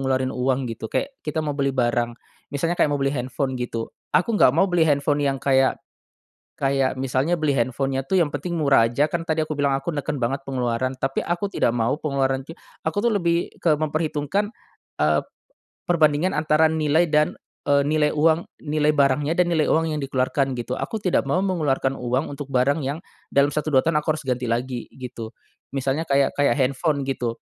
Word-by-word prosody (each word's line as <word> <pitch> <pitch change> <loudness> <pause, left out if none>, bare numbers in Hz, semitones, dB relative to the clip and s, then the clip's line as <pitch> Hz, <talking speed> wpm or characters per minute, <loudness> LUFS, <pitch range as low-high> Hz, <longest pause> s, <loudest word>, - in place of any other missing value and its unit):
ngeluarin 130 -1 0
uang 130 +1 0
gitu 110 0 -7
kayak 275 0 -1
kita 155 +1 -1
mau 150 - -1
beli 140 -1 0
barang, 120 -1 +1 0.4
misalnya 155 +4 0
kayak - - +3
mau - - +1
beli 135 +1 +1
handphone 130 +1 -2
gitu, 115 -2 -4 0.3
aku 215 +6 +1
nggak - - +8
mau 165 +6 +3
beli 175 -2 +3
handphone 145 0 +2
yang 135 -1 +1
kayak 135 -1 +3 0.8
kayak 135 -1 +1
misalnya 135 +6 0
beli 150 -3 +2
handphone-nya 135 +3 0
tuh 190 - +1
yang 160 - +1
penting 165 +5 -3
murah 140 -7 +4
aja 140 +5 +2
kan 170 - -2
tadi 160 -1 0
aku 155 - -4
bilang 140 -1 +2
aku 135 +5 -5
neken 145 0 -3
banget 135 +4 -1
pengeluaran 130 -1 -1
tapi 135 0 0
aku 175 +4 -1
tidak 120 - +1
mau 115 +1 +1
pengeluaran 135 -3 -1
ti - - -9 0.3
aku - - -2
tuh 235 - +5
lebih 170 -3 +1
ke 155 -3 +3
memperhitungkan, 155 +5 -1 0.5
eee, 75 0 +3 0.7
perbandingan 155 0 +3
antara 155 +1 +3
nilai 160 +1 +2
dan, 150 0 +3 0.4
eee, 140 0 +5
nilai 150 -1 +2
uang 160 +2 +2 0.2
nilai 150 0 +2
barangnya 145 +1 +2
dan 180 -1 +3
nilai 155 -2 +3
uang 160 0 +2
yang 150 - -2
dikeluarkan 135 0 0
gitu. 120 +1 -4
Aku - - -4
tidak 185 -3 +1
mau 185 - +2
mengeluarkan 150 -8 0
uang 125 +3 -1
untuk 145 -1 -7
barang 135 +4 +2
yang, 145 +4 -3 0.3
dalam 140 +1 +4
satu, 150 +1 -2
dua 130 - +6
tahun 165 -1 +1
aku 155 - +2
harus 155 - -9
ganti 125 0 0
lagi 120 +1 -2
gitu. 125 -3 -7 0.4
Misalnya 135 +4 0
kayak 140 0 +3
kayak 140 - +4
handphone 140 +3 +1
gitu, 120 -3 -2
140 Hz, 190 wpm, -23 LUFS, 130-155 Hz, 0.8 s, nggak